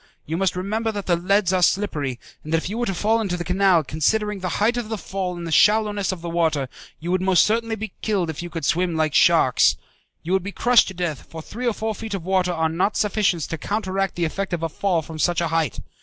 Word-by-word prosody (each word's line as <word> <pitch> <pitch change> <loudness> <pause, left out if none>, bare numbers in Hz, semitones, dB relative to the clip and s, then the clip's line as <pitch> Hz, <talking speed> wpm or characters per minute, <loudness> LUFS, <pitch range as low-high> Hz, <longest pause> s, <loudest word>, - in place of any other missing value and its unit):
You 160 - -3
must 190 +1 0
remember 215 +5 -1
that 205 -1 -5
the 175 - +2
leads 190 +2 +1
are 185 - +2
slippery, 150 - 0 0.2
and 155 - -8
that 165 - +3
if 165 - -3
you 225 - -3
were 240 - -1
to 195 - -1
fall 220 +5 +1
into 185 -5 -2
the 175 - -3
canal, 180 -1 +3
considering 210 +8 0
the 185 -1 -3
height 225 +4 +2
of 240 -3 -3
the 220 - -2
fall 185 -1 -4
and 170 - -6
the 165 - -5
shallowness 210 +4 +3
of 185 -3 -6
the 170 - -6
water, 160 -5 0 0.3
you 170 +3 -4
would 185 0 +1
most 185 -1 +4
certainly 225 +1 0
be 220 0 -6
killed 200 -5 0
if 155 - -7
you 175 - -6
could 165 -3 -5
swim 175 +4 +1
like 155 -2 0
sharks. - - +4 0.5
You 175 - -2
would 190 - +3
be 200 +3 -6
crushed 245 -1 +4
to 190 - -7
death, 170 -6 -4
for 160 -1 -8
three 245 +8 -5
or 235 - +2
four 220 +1 -3
feet 220 0 -5
of 175 -4 -6
water 185 -1 +1
are 160 -2 0
not 175 +6 0
sufficient 205 -5 +1
to 165 - -4
counteract 195 0 -2
the 175 - 0
effect 190 +4 -3
of 170 -1 -2
a 165 - 0
fall 175 0 0
from 160 0 -9
such 175 +2 +2
a 170 -1 0
height. 160 -5 0
185 Hz, 260 wpm, -22 LUFS, 165-205 Hz, 0.5 s, most